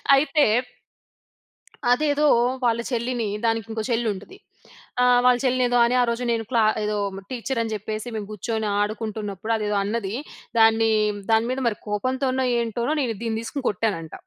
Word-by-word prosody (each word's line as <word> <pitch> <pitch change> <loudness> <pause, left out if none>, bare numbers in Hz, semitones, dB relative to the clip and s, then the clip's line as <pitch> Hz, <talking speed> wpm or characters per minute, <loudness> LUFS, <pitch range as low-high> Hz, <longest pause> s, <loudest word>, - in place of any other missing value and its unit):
అయితే 290 +2 +3 1.5
అదేదో 295 +3 +2 0.4
వాళ్ళ 230 -1 +2
చెల్లిని, 240 -1 -1 0.2
దానికి 225 -1 +1
ఇంకో 220 0 -3
చెల్లి 230 0 +1
ఉంటది. 205 - -11 0.6
ఆహ్, 250 0 +5
వాళ్ళ 250 -1 +6
చెల్లిని 255 0 +2
ఏదో 245 - +2
అని, 240 +1 +1
ఆ - - +4
రోజు 235 +1 -2
నేను 230 -1 0
క్లా 230 -3 +3 0.2
ఏదో 210 0 -1 0.3
టీచర్ 255 0 -2
అని 225 -1 -4
చెప్పేసి, 215 +2 -5
మేము 210 -2 -4
కూర్చొని 220 +1 -3
ఆడుకుంటున్నప్పుడు 215 0 -3
అదేదో 210 -1 -1
అన్నది. 205 -1 -2 0.5
దాన్ని 225 0 +5 0.4
దాని 225 +1 +3
మీద 260 - -2
మరి 215 -3 -1
కోపంతోనో, 260 +5 0
ఏంటోనో 235 +4 -1
నేను 235 -4 -1
దీన్ని 225 -1 -1
తీసుకొని 260 +3 -4
కొట్టానంట. 190 -6 -2
230 Hz, 150 wpm, -24 LUFS, 215-250 Hz, 1.5 s, వాళ్ళ